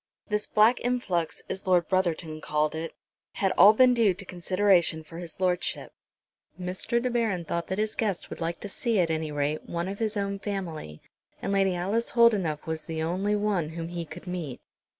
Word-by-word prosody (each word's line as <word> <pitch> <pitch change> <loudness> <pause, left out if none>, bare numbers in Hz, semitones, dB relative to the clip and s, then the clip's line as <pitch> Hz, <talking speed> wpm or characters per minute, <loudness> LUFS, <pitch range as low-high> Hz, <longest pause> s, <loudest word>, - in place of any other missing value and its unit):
This 210 0 0
black 220 +4 +4
influx, 195 -10 -1
as 190 - -6
Lord 175 -3 +3
Brotherton 170 -4 -1
called 150 0 0
it, 160 +1 -5 0.4
had 195 -1 +1
all 200 +2 +8
been 250 +3 +5
due 220 -6 +3
to 200 +2 -9
consideration 180 -2 +2
for 165 +2 -10
his 170 -1 -7
Lordship. 180 -1 -1 0.7
Mr. 185 +6 -1
De 250 +1 -1
Baron 220 -8 0
thought 170 +1 -2
that 190 - -2
his 215 0 0
guest 205 -6 -2
would - - -7
like 165 +1 -2
to - - -4
see, 225 +1 0
at 170 -2 +2
any 160 -1 -2
rate, 145 +1 -2
one 170 +1 -2
of 200 +1 -5
his 220 -2 -1
own 200 0 -2
family, 170 - -5 0.4
and 200 - -2
Lady 195 -2 +2
Alice 200 +7 -1
Holdenough 205 -11 +3
was 160 -1 -4
the 160 -1 -3
only 190 +5 0
one 205 -6 0
whom 165 +1 -5
he 175 -1 -4
could 165 +3 -10
meet. 175 -8 -5
185 Hz, 190 wpm, -27 LUFS, 165-205 Hz, 0.7 s, all